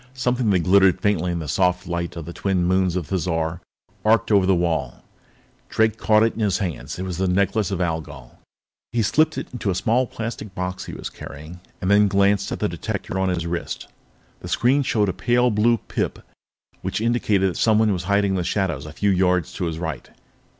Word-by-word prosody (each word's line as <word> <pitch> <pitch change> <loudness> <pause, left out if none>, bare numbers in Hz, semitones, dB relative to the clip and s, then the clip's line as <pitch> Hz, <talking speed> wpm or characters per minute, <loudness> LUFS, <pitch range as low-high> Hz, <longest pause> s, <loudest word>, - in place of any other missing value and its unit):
Something 125 -2 0
that 95 -3 +3
glittered 95 +1 +4
faintly 90 -3 +1
in 85 - -2
the 80 -2 -5
soft 90 +4 +1
light 85 -1 -3
of 85 -2 -6
the 85 - -7
twin 90 0 0
moons 95 0 +2
of 90 -3 -2
Thizar 85 -1 -2 0.4
arced 115 +1 +3
over 100 -3 +4
the 95 - +4
wall. 80 -8 -1 0.7
Drake 110 0 +1
caught 110 0 +4
it 115 - +2
in - - -9
his 105 -4 +1
hands. 85 - -4
The 95 +1 -2
Necklace 100 +2 +1
of 95 -3 -2
Algol! 80 -7 -4 0.5
He 115 -1 +1
slipped 155 +8 +2
it - - -5
into 115 -5 -2
a 95 - 0
small 115 +7 +1
plastic 110 -4 -6
box 90 0 -4
he - - -8
was - - -6
carrying 75 +5 -10 0.2
and 95 - 0
then 105 0 +5
glanced 100 0 +2
at - - -2
the - - 0
detector 95 - -4
on 95 0 +1
his 85 -2 -1
wrist. 85 0 -4 0.5
The - - -9
screen 130 +4 +2
showed 110 -6 +1
a 95 - -1
pale 125 0 +2
blue 115 +3 +3
pip - - -3 0.6
which - - -2
indicated 105 -4 +1
that - - -7
someone 110 -1 +3
was 90 -2 -4
hidden 100 0 +2
in - - 0
the 90 - -1
shadows 85 -6 -1
a 75 - -9
few 100 +4 +1
yards 90 -2 +1
to 90 - -3
his 80 -1 -3
right. 80 -3 -5
95 Hz, 205 wpm, -22 LUFS, 85-105 Hz, 0.7 s, then